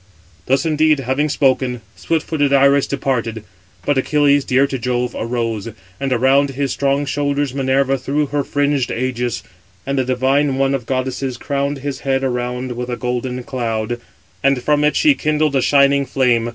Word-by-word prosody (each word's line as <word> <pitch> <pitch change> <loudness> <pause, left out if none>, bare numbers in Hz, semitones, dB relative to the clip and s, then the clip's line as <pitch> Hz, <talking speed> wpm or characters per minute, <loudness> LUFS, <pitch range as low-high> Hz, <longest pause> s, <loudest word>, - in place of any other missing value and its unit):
Thus 135 +3 +2
indeed 155 -2 +2
having 135 +4 0
spoken, 130 -3 +1
swift 165 -1 -1
footed 145 -3 0
Iris 140 0 +4
departed; 115 -5 -2 0.4
but 145 -2 +2
Achilles, 145 0 +3
dear 130 +2 +3
to 135 -2 -4
Jove, 125 0 -1
arose; 115 -2 -2 0.3
and 135 -1 -2
around 135 +3 +3
his 135 0 -2
strong 140 +1 0
shoulders 145 -1 -1
Minerva 135 0 +1
threw 145 +4 0
her 145 0 -1
fringed 145 -2 0
ægis. 125 -1 -2 0.4
And 140 0 -1
the - - +2
divine 130 +2 +1
one 135 0 +1
of 130 -4 -3
goddesses 130 0 -2
crowned 140 +2 -2
his 140 -2 -3
head 135 -1 -1
around 125 0 -2
with 125 +1 -5
a 120 - -3
golden 125 0 -3
cloud, 120 -2 -3 0.4
and 135 -2 +2
from 150 +1 +2
it 150 - +2
she 300 -2 +5
kindled 155 - 0
a 135 - +3
shining 140 0 +3
flame. 120 -3 +1
135 Hz, 165 wpm, -18 LUFS, 125-140 Hz, 0.4 s, she